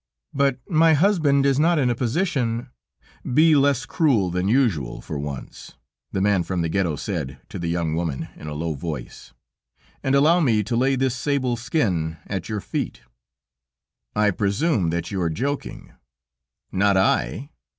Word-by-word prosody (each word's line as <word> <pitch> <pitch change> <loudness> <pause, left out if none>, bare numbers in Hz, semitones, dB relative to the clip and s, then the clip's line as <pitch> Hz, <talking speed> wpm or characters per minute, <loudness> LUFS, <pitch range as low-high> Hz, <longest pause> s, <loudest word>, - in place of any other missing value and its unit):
"But 140 -2 +2
my 160 -1 +4
husband 150 -5 +3
is 140 0 +3
not 165 +2 +3
in 130 -4 +2
a - - +2
position 120 -2 -1 0.3
..." - - -10
"Be 155 +1 +6
less 140 -2 +2
cruel 140 - +2
than 90 +2 -1
usual 105 - +1
for 75 - -6
once," 70 -2 -7 0.4
the 95 - -1
man 100 -2 +3
from 90 0 -2
the 85 - -1
Ghetto 85 -3 0
said 75 -5 -4
to - - -6
the 85 - -3
young 85 -2 -1
woman 80 -5 -2
in 75 - -10
a 75 - -5
low 80 +1 -2
voice, 75 -3 -7 0.7
"and 135 +1 +1
allow 155 +5 +5
me 115 -10 +2
to 115 +4 -2
lay 135 +3 +2
this 130 -1 0
sable 130 -1 0
skin 100 - -1
at 95 -1 -4
your 105 -2 -2
feet." - - -4 1.1
"I 105 -1 +3
presume 100 - +1
that 85 +3 -3
you 95 -2 -2
are 85 - +1
joking." 135 - -4 0.8
"Not 100 0 +2
I 95 - +1
110 Hz, 165 wpm, -23 LUFS, 85-140 Hz, 1.1 s, Be